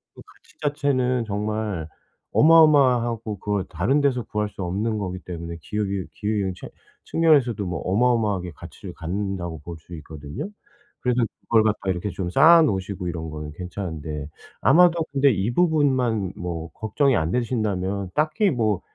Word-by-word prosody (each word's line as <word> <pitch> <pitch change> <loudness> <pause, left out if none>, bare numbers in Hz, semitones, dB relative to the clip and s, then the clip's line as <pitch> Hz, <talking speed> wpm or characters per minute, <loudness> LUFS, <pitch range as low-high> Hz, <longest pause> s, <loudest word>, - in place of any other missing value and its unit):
그 - - -12
가치 365 -3 -23
자체는 130 -4 0
정말 105 -5 -3 0.5
어마어마하고 125 - +4
그걸 100 -1 -1
다른 140 +3 +1
데서 130 -4 +1
구할 105 0 -2
수 100 - -7
없는 105 +5 -1
거기 95 -2 -4
때문에 85 -2 -7
기억이 100 0 -2
기으인 105 -3 -1
체 - - -10 0.4
측면에서도 140 -10 +3
뭐 90 -3 -3
어마어마하게 105 -3 +1
가치를 - - -10
갖는다고 85 -1 -4
볼 85 +1 -8
수 85 +2 -14
있거든요. 75 - -7 0.5
그래서 125 0 +1 0.2
그걸 115 -2 +3
갖다가 105 -3 0
이렇게 90 +3 -3
좀 90 -2 -4
쌓아 165 - +7
놓으시고 95 - -2
이런 80 -2 -4
거는 75 -1 -6
괜찮은데 80 -4 -5 0.3
아마도 170 -1 +5
근데 140 -1 +4
이 105 +3 -1
부분만 130 - +2
뭐 85 -2 -5
걱정이 125 +5 +1
안 80 +2 0
되신다면 100 -6 -1
딱히 155 +7 +2
뭐 110 - 0
105 Hz, 345 characters per minute, -24 LUFS, 90-125 Hz, 0.5 s, 쌓아